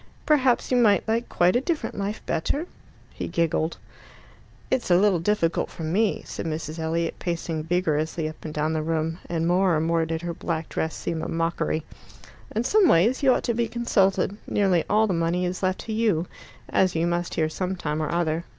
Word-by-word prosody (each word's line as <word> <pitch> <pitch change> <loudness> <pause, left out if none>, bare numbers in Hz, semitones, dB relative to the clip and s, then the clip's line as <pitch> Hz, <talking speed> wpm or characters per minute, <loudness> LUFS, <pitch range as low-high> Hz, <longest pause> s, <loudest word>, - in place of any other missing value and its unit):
"Perhaps 265 -6 +3
you 250 - +4
might 210 -5 +4
like 230 +2 0
quite 175 +3 +3
a 245 - +3
different 325 +2 -2
life 200 +2 -4
better?" 280 - -1 0.5
He - - -5
giggled. 165 -1 0 0.9
"It's 260 -6 0
a 175 - +6
little 195 -2 +3
difficult 170 -2 0
for 165 - -8
me," 195 +7 +1
said - - -5
Mrs. 155 0 -4
Elliot, 165 +1 -1
pacing 165 -2 -3
vigorously 160 -2 0
up 155 - -9
and 155 - -5
down 155 +1 -1
the 155 - 0
room, 160 +1 -1
and 165 -1 -1
more 180 -1 +3
and 155 - 0
more 165 -1 +1
did 165 +1 -3
her 170 -1 -3
black 165 -1 -3
dress 160 - -2
seem 160 -1 -3
a - - -3
mockery. 165 -1 -1 0.7
"In 225 - +1
some 400 - +4
ways 225 - +4
you 270 -2 +5
ought - - +1
to 235 - 0
be 235 0 0
consulted: 200 -5 +1
nearly 190 -5 +2
all 215 +1 +4
the 200 - 0
money 170 +2 0
is 180 +1 -3
left 185 0 0
to 220 - -5
you, 215 -7 +1 0.4
as 185 -2 +2
you 165 +1 +1
must 175 0 -1
hear 155 - +2
some 185 +4 -3
time 155 -3 -2
or 155 - -2
other. 170 -1 0
175 Hz, 200 wpm, -25 LUFS, 160-210 Hz, 0.9 s, a